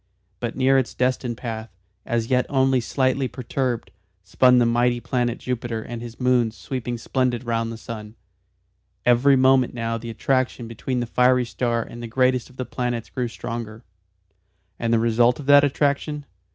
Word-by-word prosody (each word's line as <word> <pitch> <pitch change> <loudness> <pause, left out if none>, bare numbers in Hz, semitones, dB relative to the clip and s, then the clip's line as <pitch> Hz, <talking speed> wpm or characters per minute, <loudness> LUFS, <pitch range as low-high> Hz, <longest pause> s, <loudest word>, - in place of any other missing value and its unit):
But 120 -1 -3
near 135 +1 +4
its 130 - -3
destined 125 -2 0
path, 115 -2 -5 0.4
as 115 +1 -1
yet 125 -1 +2
only 135 -2 +3
slightly 130 +2 0
perturbed, 125 -1 -3 0.3
spun 125 +6 +4
the 120 - +4
mighty 120 +1 +2
planet 120 -1 -1
Jupiter 120 -3 -3
and 120 -1 -7
his 120 -1 -9
moons 125 -3 +2
sweeping 125 -3 -4
splendid 125 0 -1
round 115 -1 -1
the 115 - -7
sun. 110 -1 -8 0.9
Every 125 +3 +5
moment 130 -1 +4
now 115 -1 -2
the 115 +1 -7
attraction 130 +1 -1
between 120 +2 -3
the - - -1
fiery 125 +1 +3
star 115 0 -1
and 120 - -10
the 120 - -5
greatest 125 +1 +1
of 130 - -19
the 130 - -3
planets 120 -1 -3
grew 125 -2 -2
stronger. 115 -1 -6 1.0
And 115 -1 -1
the 115 - +4
result 115 +2 +3
of 145 - -7
that 145 0 +7
attraction? 145 +1 0
120 Hz, 165 wpm, -23 LUFS, 115-130 Hz, 1.0 s, that